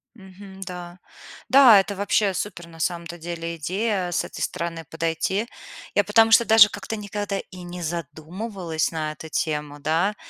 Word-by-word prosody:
Мгм, 190 Hz, -1 st, -13 dB
да. 180 Hz, -1 st, -8 dB, 0.5 s
Да, 260 Hz, -6 st, +8 dB
это 195 Hz, +1 st, -2 dB
вообще 200 Hz, 0 st, +1 dB
супер 180 Hz, -3 st, -5 dB
на 165 Hz, -1 st, -14 dB
самом-то 170 Hz, 0 st, -3 dB
деле 170 Hz, 0 st, -5 dB
идея- 185 Hz, +3 st, -1 dB
с -, -, 0 dB
этой -, -, -8 dB
стороны 165 Hz, -1 st, -3 dB
подойти. 165 Hz, +6 st, -1 dB, 0.5 s
Я -, -, +4 dB
потому 225 Hz, 0 st, +4 dB
что 235 Hz, +1 st, +7 dB
даже 220 Hz, -2 st, +8 dB
как-то 225 Hz, -, -5 dB
никогда 205 Hz, -1 st, -4 dB
и 185 Hz, -1 st, -10 dB
не 175 Hz, 0 st, -7 dB
задумывалась 170 Hz, -, -4 dB
на 155 Hz, -2 st, -3 dB
эту 160 Hz, +1 st, -10 dB
тему, 150 Hz, -2 st, -2 dB
да. 165 Hz, +8 st, +1 dB
180 Hz, 155 wpm, -24 LUFS, 165-205 Hz, 0.5 s, Да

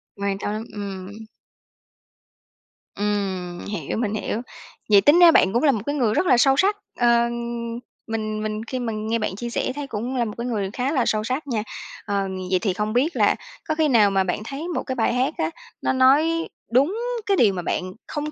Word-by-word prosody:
Quan 200 Hz, -1 st, -2 dB
tấm, 215 Hz, +2 st, -3 dB
ừm. 200 Hz, +1 st, -7 dB, 1.7 s
Ừm, 195 Hz, -4 st, -2 dB
hiểu, 205 Hz, +1 st, -4 dB
mình 215 Hz, -2 st, -1 dB
hiểu. 215 Hz, +1 st, -2 dB, 0.5 s
Vậy 205 Hz, -1 st, +7 dB
tính 295 Hz, -, +6 dB
ra 345 Hz, -1 st, +9 dB
bạn 190 Hz, -10 st, +4 dB
cũng 240 Hz, -, +1 dB
là 285 Hz, -, +6 dB
một 220 Hz, -, -2 dB
cái 285 Hz, -, -1 dB
người 240 Hz, -7 st, +2 dB
rất 365 Hz, -, +1 dB
là 250 Hz, -, +5 dB
sâu 270 Hz, +2 st, +4 dB
sắc, 405 Hz, +5 st, +3 dB, 0.2 s
ờ, 240 Hz, -, +4 dB, 1.0 s
mình 215 Hz, -1 st, -3 dB
mình 215 Hz, 0 st, -3 dB
khi 255 Hz, -, -3 dB
mà 235 Hz, -2 st, -2 dB
nghe 220 Hz, +2 st, -1 dB
bạn 210 Hz, -3 st, -2 dB
chia 235 Hz, +4 st, -5 dB
sẻ 235 Hz, -, -1 dB
thấy 290 Hz, -1 st, -5 dB
cũng 240 Hz, +2 st, -4 dB
là 240 Hz, -2 st, +1 dB
một 215 Hz, -, -5 dB
cái 235 Hz, +1 st, -3 dB
người 205 Hz, -5 st, -1 dB
khá 255 Hz, +3 st, -1 dB
là 260 Hz, -6 st, +1 dB
sâu 215 Hz, -1 st, +1 dB
sắc 260 Hz, +6 st, -3 dB
nha, 225 Hz, -5 st, -1 dB, 0.4 s
ờ, 200 Hz, -2 st, -1 dB, 0.2 s
vậy 185 Hz, -, +3 dB
thì 200 Hz, -4 st, 0 dB
không 210 Hz, +3 st, -2 dB
biết 275 Hz, +8 st, +1 dB
là -, -, +3 dB, 0.3 s
có 310 Hz, -, 0 dB
khi 315 Hz, -1 st, +2 dB
nào 225 Hz, -7 st, +5 dB
mà 195 Hz, -1 st, +2 dB
bạn 180 Hz, +1 st, -2 dB
thấy 275 Hz, +7 st, -5 dB
một 350 Hz, -, -2 dB
cái 260 Hz, -, -4 dB
bài 235 Hz, -1 st, +1 dB
hát 255 Hz, +2 st, +1 dB
á, 160 Hz, -, 0 dB, 0.3 s
nó -, -, +1 dB
nói 300 Hz, +6 st, +3 dB, 0.2 s
đúng 280 Hz, -, +3 dB, 0.3 s
cái 395 Hz, -1 st, +2 dB
điều 210 Hz, -, +5 dB
mà 180 Hz, -, -3 dB
bạn 185 Hz, +2 st, -3 dB
không 300 Hz, 0 st, -4 dB
225 Hz, 215 wpm, -23 LUFS, 205-270 Hz, 1.7 s, ra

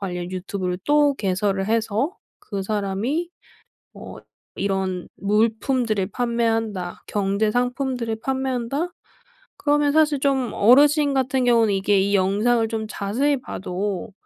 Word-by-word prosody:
관련 180 Hz, -2 st, -4 dB
유튜브를 185 Hz, -1 st, -3 dB
또 290 Hz, -1 st, +3 dB
개설을 195 Hz, -2 st, -1 dB
해서 225 Hz, -, 0 dB, 0.2 s
그 200 Hz, -2 st, -5 dB
사람이 215 Hz, -, -2 dB, 0.6 s
어 -, -, -10 dB, 0.4 s
이런 190 Hz, -2 st, -2 dB
물품들을 220 Hz, 0 st, +1 dB
판매한다. 225 Hz, -6 st, -1 dB
경제 205 Hz, +1 st, 0 dB
상품들을 245 Hz, -1 st, -1 dB
판매한다. 265 Hz, +3 st, -1 dB, 0.7 s
그러면 290 Hz, -1 st, +2 dB
사실 305 Hz, -2 st, +3 dB
좀 270 Hz, -3 st, +1 dB
어르신 285 Hz, +5 st, +5 dB
같은 260 Hz, -1 st, +1 dB
경우는 230 Hz, -4 st, +4 dB
이게 195 Hz, +1 st, +2 dB
이 200 Hz, +1 st, +1 dB
영상을 215 Hz, +5 st, +2 dB
좀 220 Hz, -1 st, -3 dB
자세히 250 Hz, +8 st, 0 dB
봐도 190 Hz, -2 st, -4 dB
225 Hz, 265 characters per minute, -22 LUFS, 195-265 Hz, 0.7 s, 어르신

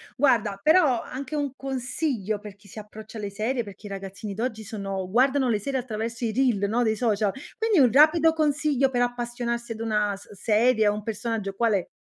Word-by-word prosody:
Guarda, 225 Hz, -7 st, +2 dB
però 310 Hz, -, +4 dB
anche 275 Hz, +3 st, -6 dB
un 285 Hz, -3 st, -1 dB
consiglio 255 Hz, -, -2 dB
per 205 Hz, -2 st, -10 dB
chi 205 Hz, 0 st, -21 dB
si 210 Hz, -, -14 dB
approccia 215 Hz, +1 st, -10 dB
alle 205 Hz, -2 st, -4 dB
serie, 230 Hz, +4 st, -1 dB
perché 200 Hz, 0 st, -11 dB
i -, -, -9 dB
ragazzini 195 Hz, +1 st, -6 dB
d'oggi 220 Hz, -1 st, -3 dB
sono 195 Hz, -3 st, -5 dB
guardano 260 Hz, +3 st, +3 dB
le 215 Hz, -, +2 dB
serie 265 Hz, +4 st, -2 dB
attraverso 230 Hz, 0 st, -4 dB
i 220 Hz, -, 0 dB
reel, 220 Hz, -5 st, +1 dB
no, 240 Hz, +2 st, +1 dB
dei 220 Hz, -1 st, +1 dB
social, 215 Hz, -3 st, +1 dB, 0.3 s
quindi 440 Hz, -6 st, +2 dB
un 250 Hz, -4 st, +5 dB
rapido 315 Hz, +3 st, +5 dB
consiglio 295 Hz, -3 st, +1 dB
per 245 Hz, -2 st, 0 dB
appassionarsi 240 Hz, -1 st, -2 dB
ad 225 Hz, -, -5 dB
una 210 Hz, -3 st, 0 dB
s 200 Hz, +1 st, -15 dB
serie, 220 Hz, +3 st, +2 dB
a 205 Hz, -, +4 dB
un 210 Hz, 0 st, -4 dB
personaggio 215 Hz, -2 st, -3 dB
qual 230 Hz, -1 st, +2 dB
è? 190 Hz, -3 st, 0 dB
230 Hz, 200 wpm, -25 LUFS, 210-260 Hz, 0.3 s, un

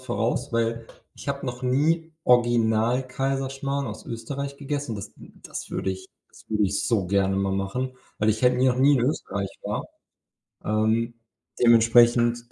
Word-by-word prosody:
voraus, 120 Hz, +2 st, -2 dB
weil 115 Hz, 0 st, -1 dB, 0.3 s
ich -, -, -9 dB
habe 140 Hz, -1 st, -3 dB
noch 125 Hz, +1 st, -5 dB
nie 160 Hz, +6 st, +1 dB
original 120 Hz, 0 st, +3 dB
Kaiserschmarrn 135 Hz, +1 st, -2 dB
aus 105 Hz, -1 st, -7 dB
Österreich 140 Hz, +5 st, -5 dB
gegessen. 140 Hz, -4 st, -3 dB
Das 100 Hz, -, -8 dB
das -, -, -10 dB
würde 95 Hz, 0 st, -2 dB, 0.3 s
das -, -, -18 dB
würde 105 Hz, -1 st, +1 dB
ich 100 Hz, +1 st, -1 dB
so 110 Hz, -6 st, +1 dB
gerne 95 Hz, 0 st, +1 dB
mal 95 Hz, 0 st, 0 dB
machen, 125 Hz, +7 st, -3 dB, 0.2 s
weil 110 Hz, -, +1 dB
ich 110 Hz, +3 st, +1 dB
halt 125 Hz, 0 st, +4 dB
noch 130 Hz, -1 st, +3 dB
nie 140 Hz, +2 st, +5 dB
in 120 Hz, -, +1 dB
Österreich 100 Hz, -8 st, -2 dB
war. -, -, -3 dB, 0.8 s
Ähm, 110 Hz, +2 st, +1 dB, 0.5 s
dementsprechend, 120 Hz, 0 st, +4 dB
120 Hz, 150 wpm, -25 LUFS, 110-135 Hz, 0.8 s, nie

